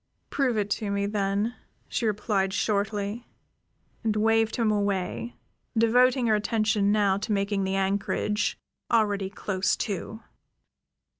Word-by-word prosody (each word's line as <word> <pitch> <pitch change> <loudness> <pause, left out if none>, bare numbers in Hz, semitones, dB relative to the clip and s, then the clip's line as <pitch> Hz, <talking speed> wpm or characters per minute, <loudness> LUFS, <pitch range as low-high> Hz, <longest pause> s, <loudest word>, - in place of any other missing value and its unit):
"Prove 260 -5 +1
it 205 -1 -1
to 210 -1 -1
me, 200 0 0
then," 200 +2 0 0.3
she 230 - -1
replied 200 -2 0
shortly, 205 +2 -1 0.8
and 220 -2 +1
waved 225 +1 +2
him 225 -3 +2
away, 205 +2 -1 0.4
devoting 245 +3 +4
her 220 - +3
attention 210 -1 +1
now 205 -2 +3
to 215 +2 -4
making 200 -1 0
the 190 0 -1
anchorage, 200 +2 0 0.3
already 205 -4 +2
close 195 -1 -1
to. 215 +1 -4
210 Hz, 125 wpm, -27 LUFS, 200-225 Hz, 0.8 s, devoting